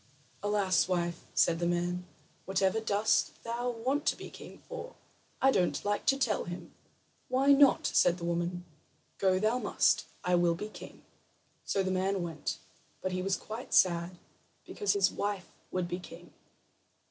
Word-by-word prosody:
"Alas, 200 Hz, -5 st, +2 dB
wife," 175 Hz, -2 st, -1 dB
said 165 Hz, -1 st, +3 dB
the 170 Hz, -, 0 dB
man, 175 Hz, +1 st, -1 dB, 0.4 s
"whatever 190 Hz, +2 st, +1 dB
dost 215 Hz, -1 st, +1 dB
thou 235 Hz, +2 st, -2 dB
want 255 Hz, +5 st, -1 dB
to -, -, +3 dB
be -, -, -9 dB
king -, -, -11 dB
for? -, -, -7 dB, 0.4 s
I 270 Hz, -, +5 dB
don't 180 Hz, -5 st, 0 dB
like 205 Hz, 0 st, -1 dB
to 270 Hz, -, +4 dB
tell 235 Hz, -6 st, 0 dB
him." 175 Hz, 0 st, -8 dB, 0.5 s
"Why 265 Hz, +2 st, +3 dB
not?" 280 Hz, -1 st, +6 dB
said 175 Hz, -, +3 dB
the 175 Hz, -, -9 dB
woman. 175 Hz, +1 st, -2 dB, 0.5 s
"Go 190 Hz, -1 st, +3 dB
thou 215 Hz, +5 st, +1 dB
must. -, -, +2 dB, 0.2 s
I 180 Hz, -, +1 dB
will 175 Hz, -1 st, +3 dB
be 210 Hz, +5 st, -6 dB
king." -, -, -12 dB, 0.6 s
So 195 Hz, -, +1 dB
the 190 Hz, -, -1 dB
man 190 Hz, 0 st, 0 dB
went; 165 Hz, -3 st, -4 dB, 0.5 s
but 185 Hz, -, -1 dB
he 185 Hz, 0 st, -1 dB
was 195 Hz, +1 st, 0 dB
quite 225 Hz, +3 st, -5 dB
sad 175 Hz, 0 st, +3 dB, 0.5 s
because 415 Hz, -, 0 dB
his 195 Hz, -2 st, +3 dB
wife 200 Hz, -2 st, -3 dB, 0.2 s
would 185 Hz, -1 st, -2 dB
be 175 Hz, +1 st, -3 dB
king. 180 Hz, -, -12 dB
190 Hz, 160 wpm, -31 LUFS, 175-220 Hz, 0.6 s, not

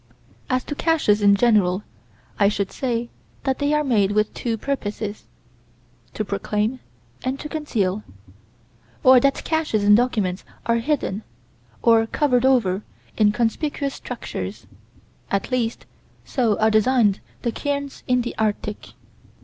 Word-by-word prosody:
As 255 Hz, -1 st, +1 dB
to -, -, -5 dB
caches 290 Hz, -10 st, +2 dB
in 200 Hz, 0 st, +6 dB
general, 205 Hz, -4 st, +3 dB, 0.6 s
I 200 Hz, -1 st, +5 dB
should 200 Hz, -2 st, -2 dB
say 240 Hz, -2 st, -2 dB, 0.3 s
that 265 Hz, -1 st, 0 dB
they 285 Hz, 0 st, +1 dB
are 300 Hz, 0 st, +2 dB
made 210 Hz, -7 st, +2 dB
with 215 Hz, 0 st, +1 dB
two 230 Hz, -2 st, -2 dB
purposes: 215 Hz, -5 st, -4 dB, 0.9 s
to 215 Hz, -, -2 dB
proclaim 210 Hz, +5 st, -1 dB, 0.4 s
and 260 Hz, +2 st, -2 dB
to -, -, -5 dB
conceal; 220 Hz, -11 st, -1 dB, 1.0 s
or 255 Hz, 0 st, +8 dB
that 275 Hz, +2 st, +1 dB
caches 305 Hz, -11 st, 0 dB
documents 205 Hz, -4 st, +3 dB, 0.2 s
are 230 Hz, 0 st, +2 dB
hidden, 230 Hz, -5 st, -1 dB, 0.6 s
or 225 Hz, -1 st, +5 dB
covered 255 Hz, -2 st, +2 dB
over, 210 Hz, -8 st, +2 dB, 0.3 s
in 210 Hz, -2 st, +4 dB
conspicuous 275 Hz, +5 st, -1 dB
structures; -, -, -6 dB, 0.6 s
at 195 Hz, +5 st, -1 dB
least, 235 Hz, -2 st, -1 dB, 0.4 s
so 235 Hz, -6 st, +1 dB
are 220 Hz, 0 st, +3 dB
designed 215 Hz, -2 st, +3 dB, 0.2 s
the 235 Hz, -, 0 dB
cairns 280 Hz, +1 st, -3 dB
in 250 Hz, -1 st, +2 dB
the 240 Hz, -, -4 dB
Arctic. 210 Hz, -1 st, -2 dB
230 Hz, 130 wpm, -22 LUFS, 210-265 Hz, 1.0 s, or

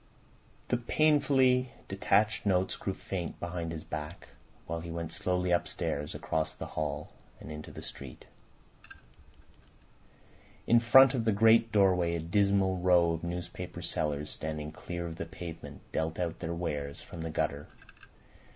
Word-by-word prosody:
The 125 Hz, -, +2 dB
painfully 130 Hz, -2 st, +3 dB, 0.2 s
detached 105 Hz, +2 st, +2 dB
notes 95 Hz, -2 st, +1 dB
grew 95 Hz, -, -3 dB
faint 90 Hz, -3 st, -5 dB
behind 85 Hz, -1 st, -4 dB
his 80 Hz, -1 st, -6 dB
back 75 Hz, +2 st, -6 dB, 0.4 s
while 85 Hz, +1 st, -3 dB
he 85 Hz, +1 st, -7 dB
went 85 Hz, -1 st, -4 dB
slowly 90 Hz, +1 st, 0 dB
upstairs, 75 Hz, -4 st, -1 dB
across 80 Hz, 0 st, -2 dB
the -, -, -6 dB
hall, 75 Hz, -1 st, -3 dB, 0.3 s
and 75 Hz, -, -9 dB
into 75 Hz, 0 st, -7 dB
the -, -, -9 dB
street. 70 Hz, -3 st, -9 dB, 2.4 s
In 120 Hz, -, +6 dB
front 130 Hz, +3 st, +7 dB
of 125 Hz, -4 st, 0 dB
the 110 Hz, -, +3 dB
great 115 Hz, +2 st, +5 dB
doorway 90 Hz, -5 st, +3 dB
a -, -, -1 dB
dismal 95 Hz, +2 st, +2 dB
row 90 Hz, -2 st, +4 dB
of 80 Hz, 0 st, -3 dB
newspaper 85 Hz, +1 st, -5 dB
sellers 75 Hz, 0 st, -1 dB
standing 75 Hz, -1 st, -5 dB
clear 85 Hz, +2 st, -5 dB
of 85 Hz, -1 st, -6 dB
the -, -, -4 dB
pavement 85 Hz, 0 st, -8 dB
dealt 80 Hz, 0 st, -1 dB
out 85 Hz, -2 st, -2 dB
their 85 Hz, 0 st, -3 dB
wares 75 Hz, -4 st, -3 dB
from 85 Hz, -, -9 dB
the 80 Hz, -, -3 dB
gutter. 75 Hz, -2 st, -2 dB
85 Hz, 145 wpm, -31 LUFS, 80-100 Hz, 2.4 s, front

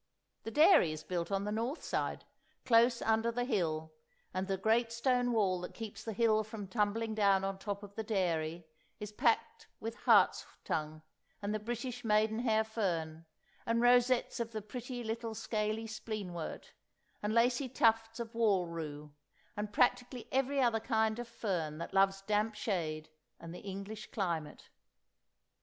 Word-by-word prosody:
The -, -, -5 dB
dairy 300 Hz, -, +6 dB
is 155 Hz, 0 st, -6 dB
built 175 Hz, -1 st, -3 dB
on 195 Hz, 0 st, 0 dB
the 210 Hz, -, -2 dB
north 235 Hz, +8 st, -2 dB
side, -, -, -2 dB, 0.4 s
close 235 Hz, 0 st, +4 dB
under 225 Hz, +1 st, +2 dB
the 245 Hz, +1 st, -1 dB
hill, 160 Hz, -, -1 dB, 0.4 s
and 185 Hz, +1 st, -2 dB
the 195 Hz, -1 st, 0 dB
great 225 Hz, +4 st, +2 dB
stone 245 Hz, +1 st, +1 dB
wall 195 Hz, -6 st, +2 dB
that 180 Hz, -, -7 dB
keeps 225 Hz, -3 st, -7 dB
the 225 Hz, -, -4 dB
hill 220 Hz, 0 st, +3 dB
from 215 Hz, -2 st, -7 dB
tumbling 220 Hz, +2 st, 0 dB
down 200 Hz, -3 st, +3 dB
on 195 Hz, 0 st, -2 dB
top 200 Hz, 0 st, -4 dB
of 200 Hz, 0 st, -10 dB
the 220 Hz, -, -3 dB
dairy 175 Hz, -6 st, -1 dB, 0.3 s
is 210 Hz, 0 st, -6 dB
packed 225 Hz, +2 st, 0 dB
with 225 Hz, +1 st, -4 dB
hart's -, -, +4 dB, 0.2 s
tongue 155 Hz, 0 st, -3 dB, 0.4 s
and 205 Hz, 0 st, -2 dB
the 215 Hz, -, -1 dB
British 240 Hz, +3 st, -4 dB
maiden 220 Hz, 0 st, +2 dB
hair 220 Hz, -3 st, +2 dB
fern, 165 Hz, -7 st, -3 dB, 0.4 s
and 230 Hz, 0 st, +1 dB
rosettes 245 Hz, +1 st, +3 dB
of 230 Hz, -1 st, -3 dB
the 215 Hz, -, -3 dB
pretty 245 Hz, +3 st, -6 dB
little 225 Hz, 0 st, -4 dB
scaly 215 Hz, 0 st, -2 dB
spleenwort, 215 Hz, -6 st, -6 dB, 0.5 s
and 210 Hz, -, -1 dB
lacy 245 Hz, +3 st, +3 dB
tufts 225 Hz, -1 st, +2 dB
of 230 Hz, 0 st, -5 dB
wall 210 Hz, -6 st, +3 dB
rue, 150 Hz, -3 st, -6 dB, 0.4 s
and 210 Hz, 0 st, -4 dB
practically 245 Hz, +2 st, +1 dB
every 270 Hz, +1 st, +1 dB
other 235 Hz, -4 st, +3 dB
kind 220 Hz, -1 st, +1 dB
of 240 Hz, -, -5 dB
fern 175 Hz, -10 st, -3 dB
that 170 Hz, +3 st, -6 dB
loves 195 Hz, 0 st, +3 dB
damp 210 Hz, +1 st, 0 dB
shade 160 Hz, -7 st, -2 dB, 0.3 s
and 165 Hz, 0 st, -8 dB
the 180 Hz, -, -8 dB
English 200 Hz, +2 st, -7 dB
climate. 170 Hz, -7 st, -3 dB
215 Hz, 160 wpm, -33 LUFS, 190-230 Hz, 0.5 s, dairy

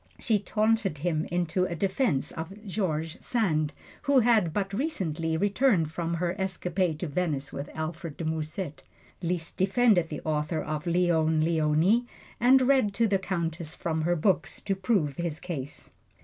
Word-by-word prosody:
She 220 Hz, -3 st, +1 dB
taunted 215 Hz, -4 st, +1 dB
him 155 Hz, +1 st, -1 dB
into 175 Hz, +1 st, +1 dB
a 170 Hz, -, -3 dB
defense 190 Hz, -, 0 dB
of 190 Hz, +7 st, -8 dB
George 165 Hz, -5 st, -2 dB
Sand, 155 Hz, -11 st, 0 dB, 0.3 s
who 280 Hz, -3 st, +4 dB
had 220 Hz, -8 st, +3 dB
but 195 Hz, +2 st, -2 dB
recently 170 Hz, -, -1 dB
returned 200 Hz, -, +2 dB
from 170 Hz, +1 st, -2 dB
her 170 Hz, +1 st, -1 dB
escapade 180 Hz, -3 st, -1 dB
to 175 Hz, -, -1 dB
Venice 145 Hz, -3 st, -2 dB
with 140 Hz, +1 st, -5 dB
Alfred 160 Hz, -1 st, -5 dB
de 165 Hz, -, -4 dB
Musset. 155 Hz, -1 st, -3 dB, 0.4 s
Liszt 170 Hz, -1 st, -2 dB
defended 195 Hz, -3 st, +3 dB
the 150 Hz, -, -5 dB
author 155 Hz, +1 st, -1 dB
of 150 Hz, +1 st, -4 dB
"Leone 165 Hz, -2 st, +2 dB
Leoni," 165 Hz, +8 st, +2 dB, 0.3 s
and 260 Hz, +2 st, +6 dB
read 255 Hz, -6 st, +3 dB
to 230 Hz, +1 st, +3 dB
the 195 Hz, -2 st, +2 dB
Countess 170 Hz, -4 st, -3 dB
from 160 Hz, -1 st, -2 dB
her 175 Hz, +2 st, +1 dB
books 175 Hz, +1 st, +1 dB
to 195 Hz, -2 st, -1 dB
prove 185 Hz, -, 0 dB
his 170 Hz, -3 st, -2 dB
case. 145 Hz, -6 st, -6 dB
175 Hz, 155 wpm, -28 LUFS, 160-200 Hz, 0.4 s, and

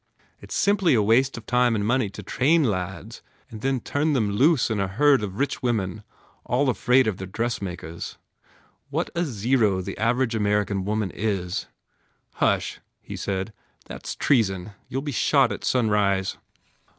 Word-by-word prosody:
It -, -, -13 dB
s -, -, -4 dB
simply 200 Hz, -7 st, +3 dB
a 110 Hz, -, +4 dB
waste 125 Hz, +5 st, +3 dB
of 115 Hz, -, -9 dB
time 125 Hz, -1 st, +2 dB
and 100 Hz, -1 st, -1 dB
money 120 Hz, -1 st, +1 dB
to 105 Hz, +1 st, -9 dB
train 150 Hz, -, +2 dB
lads 95 Hz, -6 st, -3 dB, 0.3 s
and 110 Hz, -2 st, -8 dB
then 135 Hz, 0 st, 0 dB
turn 150 Hz, +5 st, 0 dB
them 110 Hz, -7 st, +1 dB
loose 130 Hz, +4 st, +3 dB
in 110 Hz, -, 0 dB
a 100 Hz, -, 0 dB
herd 135 Hz, +6 st, +3 dB
of 100 Hz, -2 st, -5 dB
rich 140 Hz, +3 st, -1 dB
women 110 Hz, -5 st, -1 dB, 0.4 s
all 130 Hz, +3 st, +1 dB
afraid 125 Hz, +4 st, +3 dB
of 105 Hz, -4 st, -1 dB
their 95 Hz, -, -6 dB
dressmakers. 95 Hz, -6 st, -4 dB, 0.7 s
What -, -, -2 dB
a 170 Hz, -, 0 dB
zero 115 Hz, -, +1 dB
the 95 Hz, +1 st, -6 dB
average 120 Hz, +2 st, +1 dB
American 105 Hz, -2 st, 0 dB
woman 105 Hz, -2 st, -1 dB
is!" 95 Hz, -4 st, -2 dB, 0.7 s
"Hush," -, -, +1 dB, 0.2 s
he -, -, -8 dB
said, 95 Hz, +2 st, -3 dB, 0.3 s
"That -, -, -9 dB
s -, -, -3 dB
treason! 100 Hz, -7 st, +1 dB, 0.2 s
You 130 Hz, 0 st, -4 dB
ll -, -, -10 dB
be 145 Hz, -, -3 dB
shot 135 Hz, +1 st, +3 dB
at -, -, -5 dB
sunrise!" 105 Hz, -5 st, +1 dB
110 Hz, 170 wpm, -24 LUFS, 100-130 Hz, 0.7 s, a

